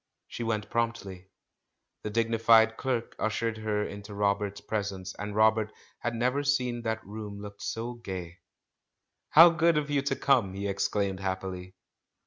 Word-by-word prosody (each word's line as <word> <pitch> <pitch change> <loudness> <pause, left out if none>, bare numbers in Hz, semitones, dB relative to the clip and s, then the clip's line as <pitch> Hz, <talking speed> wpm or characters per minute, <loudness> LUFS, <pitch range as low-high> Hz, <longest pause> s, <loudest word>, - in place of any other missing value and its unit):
She - - -7
went 110 -2 -2
promptly. 115 -6 -2 0.7
The - - -4
dignified 115 0 +4
clerk 125 -3 -2
ush 110 +1 -1
ered 115 -1 -1
her 105 -1 0
into 100 +1 -8
Robert's 100 0 0
presence, 100 -3 -4
and 105 0 -5
Robert 110 0 +3 0.3
had 120 0 -2
never 125 +4 +1
seen 125 -4 0
that 110 -1 -3
room 105 0 -7
look 100 0 -9
so 120 +1 -3
gay. 95 -6 -7 0.9
"How 165 +2 +9
good 165 -1 +3
of 150 -1 -1
you 140 -1 +2
to 140 - -1
come!" 115 -9 +2
he 100 +1 -3
exclaimed 100 -1 -1
happily. 95 -1 -4
110 Hz, 150 wpm, -29 LUFS, 100-120 Hz, 0.9 s, How